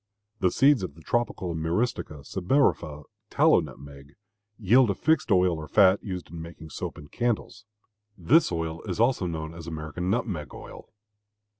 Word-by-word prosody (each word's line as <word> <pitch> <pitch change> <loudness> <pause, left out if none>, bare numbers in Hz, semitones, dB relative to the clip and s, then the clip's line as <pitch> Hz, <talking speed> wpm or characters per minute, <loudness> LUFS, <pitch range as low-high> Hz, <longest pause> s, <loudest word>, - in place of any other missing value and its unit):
The 95 - +3
seeds 140 +4 +4
of 90 -6 -5
the 80 - -15
tropical 120 -6 -1
M. 80 -1 -4
sebifera 85 - -1 0.3
(tallow - - +4
nutmeg) 70 +1 -10 0.4
yield 115 +3 +4
a 100 - 0
fixed 160 -2 +1
oil 90 -2 +4
or 75 - -7
fat 95 +4 +4
used 90 -6 -6
in 85 -1 -7
making 80 -1 -10
soap - - -5
and 75 0 -12
candles. 120 -2 -2 0.5
This 130 - +3
oil 80 -1 -3
is 90 - -3
also 115 -5 +2
known 80 -1 -5
as 85 -1 -10
American 80 +2 -4
nutmeg 95 - -2
oil. - - -11
90 Hz, 155 wpm, -26 LUFS, 80-110 Hz, 0.5 s, seeds